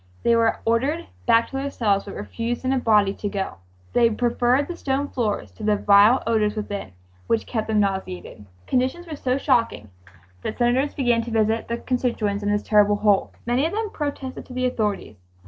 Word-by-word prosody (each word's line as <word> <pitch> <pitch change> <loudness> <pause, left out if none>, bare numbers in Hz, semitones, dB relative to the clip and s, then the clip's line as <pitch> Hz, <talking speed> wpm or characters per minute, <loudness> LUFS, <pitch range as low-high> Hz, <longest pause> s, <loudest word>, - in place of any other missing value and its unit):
They 235 - +4
were 230 -1 +2
ordered 270 +9 +1 0.2
back 230 0 +4
to 270 - -3
their 275 +1 -2
cells 205 -7 0
but 200 - -8
refused 235 +4 -4
in 260 - +2
a 265 - +1
body 210 -4 +3
to 205 - -4
go. 195 - -4 0.4
They 235 -1 +4
preferred 245 +4 +1
the 350 - -5
stone 280 -2 -2
floors 215 -5 -2
to 220 - -12
the 210 0 +3
vile 205 +5 +5
odors 215 -2 +1
within, 205 - -5 0.3
which 225 -1 +1
kept 220 -3 -3
them 215 -1 +2
nauseated. 190 - -4 0.2
Conditions 260 +8 0
were 320 -3 -6
so 255 -2 -1
shocking 230 - 0 0.5
that - - -4
Senators 250 +4 +1
began 240 -4 +2
to 235 - -6
visit 220 0 +1
their 235 - -2
constituents 235 -5 -1
in 205 - -1
this 205 0 0
terrible 210 -1 +4
hole. 205 -1 +2
Many 240 +3 +1
of 330 - -6
them 430 0 -2
protested 285 -3 -5
to 255 - -10
the 255 0 -1
authorities. 210 - -2
230 Hz, 195 wpm, -23 LUFS, 210-255 Hz, 0.5 s, vile